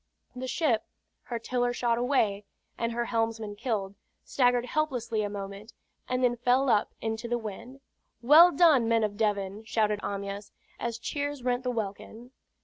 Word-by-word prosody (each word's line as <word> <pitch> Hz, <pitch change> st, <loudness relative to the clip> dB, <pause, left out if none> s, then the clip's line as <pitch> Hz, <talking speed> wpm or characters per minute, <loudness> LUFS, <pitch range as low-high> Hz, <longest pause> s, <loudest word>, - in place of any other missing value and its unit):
The 255 Hz, +1 st, -5 dB
ship, 255 Hz, -6 st, +1 dB, 0.4 s
her 240 Hz, -, -3 dB
tiller 245 Hz, +1 st, -1 dB
shot 240 Hz, -1 st, 0 dB
away, 225 Hz, -6 st, +1 dB, 0.3 s
and 230 Hz, 0 st, -2 dB
her 235 Hz, +1 st, -1 dB
helmsman 225 Hz, -3 st, -2 dB
killed, 205 Hz, -4 st, -2 dB, 0.3 s
staggered 245 Hz, -2 st, +2 dB
helplessly 250 Hz, -6 st, -1 dB
a 205 Hz, -, -2 dB
moment, 200 Hz, +2 st, -7 dB, 0.4 s
and 255 Hz, 0 st, 0 dB
then 240 Hz, -1 st, +2 dB
fell 250 Hz, +3 st, +2 dB
up 210 Hz, -, +1 dB
into 225 Hz, +1 st, -3 dB
the 240 Hz, 0 st, 0 dB
wind. 235 Hz, +5 st, -8 dB, 0.4 s
"Well 310 Hz, +8 st, +8 dB
done, 290 Hz, -7 st, +5 dB
men 230 Hz, -1 st, +3 dB
of 210 Hz, -1 st, -1 dB
Devon!" 205 Hz, -1 st, -1 dB
shouted 215 Hz, -2 st, 0 dB
Amyas, 200 Hz, 0 st, -5 dB, 0.3 s
as 235 Hz, -1 st, -3 dB
cheers 285 Hz, +2 st, -4 dB
rent 245 Hz, 0 st, 0 dB
the 255 Hz, -, -2 dB
welkin. 225 Hz, +2 st, -5 dB
235 Hz, 155 wpm, -28 LUFS, 215-250 Hz, 0.4 s, Well